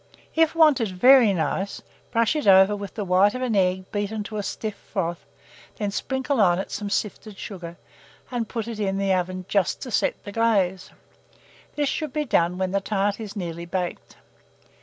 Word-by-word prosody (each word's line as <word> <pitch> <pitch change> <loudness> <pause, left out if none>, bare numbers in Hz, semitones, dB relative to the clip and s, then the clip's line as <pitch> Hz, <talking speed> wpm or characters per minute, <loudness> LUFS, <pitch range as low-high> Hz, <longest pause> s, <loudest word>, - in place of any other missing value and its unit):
If 325 0 +3
wanted 305 -8 +5
very 235 +4 +6
nice, 190 +3 -2 0.3
brush 230 +5 +2
it 295 -8 -1
over 190 +1 +7
with 200 -1 -7
the 210 - -3
white 190 +4 +4
of 255 - -3
an 240 -4 0
egg 185 -1 +1
beaten 205 +1 -2
to 215 +1 -6
a - - -1
stiff 215 +1 -4
froth, 175 -6 -4 0.5
then 205 -2 -2
sprinkle 265 +3 -1
on 175 -3 +4
it 190 - -4
some 205 -1 -4
sifted 210 0 -3
sugar, 175 -4 -8 0.5
and 235 -3 -2
put 230 -2 -4
it 230 -2 -6
in 195 -2 -1
the 195 -1 +1
oven 185 0 -2
just 195 -3 +1
to 250 - -7
set - - 0
the 205 - -7
glaze: 200 -5 +1 0.9
this 290 -1 0
should 300 0 -3
be 300 -1 -1
done 175 -7 +1
when 185 -1 -1
the 200 0 0
tart 200 0 -1
is 215 -2 -7
nearly 170 -3 -5
baked. 180 0 -4
200 Hz, 185 wpm, -24 LUFS, 185-230 Hz, 0.9 s, over